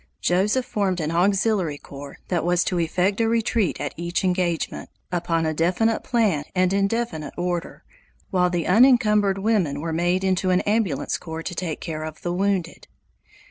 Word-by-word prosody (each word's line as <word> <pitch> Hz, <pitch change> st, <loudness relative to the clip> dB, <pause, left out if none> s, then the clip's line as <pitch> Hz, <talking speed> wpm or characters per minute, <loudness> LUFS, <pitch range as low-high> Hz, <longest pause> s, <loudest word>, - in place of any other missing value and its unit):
Joseph 205 Hz, +8 st, +1 dB
formed 190 Hz, -4 st, -1 dB
an 155 Hz, -1 st, -2 dB
auxiliary 190 Hz, -2 st, +1 dB
corps 140 Hz, 0 st, -10 dB
that 175 Hz, -3 st, 0 dB
was 175 Hz, +1 st, +2 dB
to 180 Hz, -, -1 dB
effect 180 Hz, +5 st, 0 dB
a 225 Hz, -, +2 dB
retreat 225 Hz, -4 st, 0 dB
at 145 Hz, -, -3 dB
each 170 Hz, +2 st, -2 dB
engagement, 180 Hz, -3 st, -1 dB, 0.2 s
upon 165 Hz, -2 st, 0 dB
a 155 Hz, -, 0 dB
definite 185 Hz, +8 st, +1 dB
plan 210 Hz, -, +1 dB
and 185 Hz, 0 st, +2 dB
in 195 Hz, 0 st, +2 dB
definite 230 Hz, -9 st, -3 dB
order, 175 Hz, -1 st, -3 dB, 0.5 s
while 180 Hz, -2 st, +2 dB
the 175 Hz, -2 st, -1 dB
unencumbered 210 Hz, -3 st, +4 dB
women 195 Hz, -9 st, 0 dB
were 165 Hz, +1 st, -3 dB
made 175 Hz, +3 st, +1 dB
into 185 Hz, -1 st, +1 dB
an 180 Hz, 0 st, +3 dB
ambulance 215 Hz, -1 st, 0 dB
corps 160 Hz, -1 st, -6 dB
to 180 Hz, -, -5 dB
take 165 Hz, -3 st, -4 dB
care 155 Hz, -2 st, -4 dB
of 155 Hz, -1 st, -8 dB
the 175 Hz, -, -1 dB
wounded. 190 Hz, -2 st, -1 dB
180 Hz, 170 wpm, -23 LUFS, 165-200 Hz, 0.5 s, unencumbered